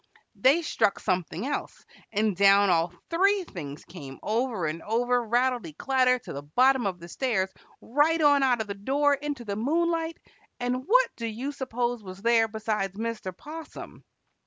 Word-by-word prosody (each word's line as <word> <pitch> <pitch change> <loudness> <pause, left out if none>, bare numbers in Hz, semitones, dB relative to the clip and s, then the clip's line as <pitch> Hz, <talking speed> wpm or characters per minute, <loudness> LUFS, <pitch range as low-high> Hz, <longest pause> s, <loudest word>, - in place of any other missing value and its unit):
they 290 +6 +3
struck 205 -9 +1
something 185 +1 -2
else, 285 - -4 0.3
and 215 -2 +1
down 200 +1 +5
all 170 0 +2 0.2
three 390 +3 +3
things 150 - -8
came 145 -7 -10
over 225 -4 -1
and 160 +2 -3
over, 245 +4 +1
rattlety 240 -7 0
clatter, 255 -2 +3
to 245 - -9
the 140 - -5
bottom 250 - +3
of 180 -2 -4
the 170 - -10
stairs, 195 -2 -1 0.3
right 295 +7 +2
on 290 -2 +5
out 250 -4 +3
of - - -3
the 200 - -5
door 275 +8 +1
into 285 -3 -4
the 200 -1 -3
moonlight, 330 +7 0 0.4
and 250 +2 -2
what - - +4
do 230 - -4
you 240 +6 -4
suppose 245 -3 -2
was 185 -1 -10
there 230 -1 +4
besides 210 -3 -2
Mr. 225 -4 -3
'Possum? 320 +2 -10
235 Hz, 165 wpm, -27 LUFS, 200-275 Hz, 0.4 s, down